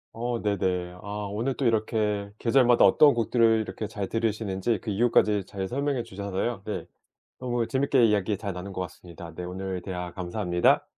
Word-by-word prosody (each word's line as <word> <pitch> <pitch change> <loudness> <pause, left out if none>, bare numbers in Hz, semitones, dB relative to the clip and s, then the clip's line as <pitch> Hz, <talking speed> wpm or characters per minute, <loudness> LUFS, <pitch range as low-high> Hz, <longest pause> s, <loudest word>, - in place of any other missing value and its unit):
어 120 +1 -2
네네. 90 -3 -1
아 - - -11 0.2
오늘 120 +6 -1
또 135 - -2
이렇게 110 -3 0
계절마다 120 0 +4
어떤 145 +8 +6
곡들을 115 -1 +3
이렇게 110 0 -5
잘 100 -2 -4
들으시는지 110 -1 -1
그 110 - -4
이유까지 105 -2 +3
잘 95 -2 -4
설명해 140 +1 -1
주셔서요. 100 0 -3
네. 105 - -4 0.5
너무 120 -2 -1
재밌게 135 -2 +3
이야기 105 -1 +1
잘 100 -3 -4
나눈 95 +2 -7
것 95 - -5
같습니다. 85 -2 -8
네 90 - -6
오늘 95 0 -4
대화 90 -2 -5
감사합니다. 90 -1 +1
105 Hz, 370 characters per minute, -27 LUFS, 95-115 Hz, 0.5 s, 어떤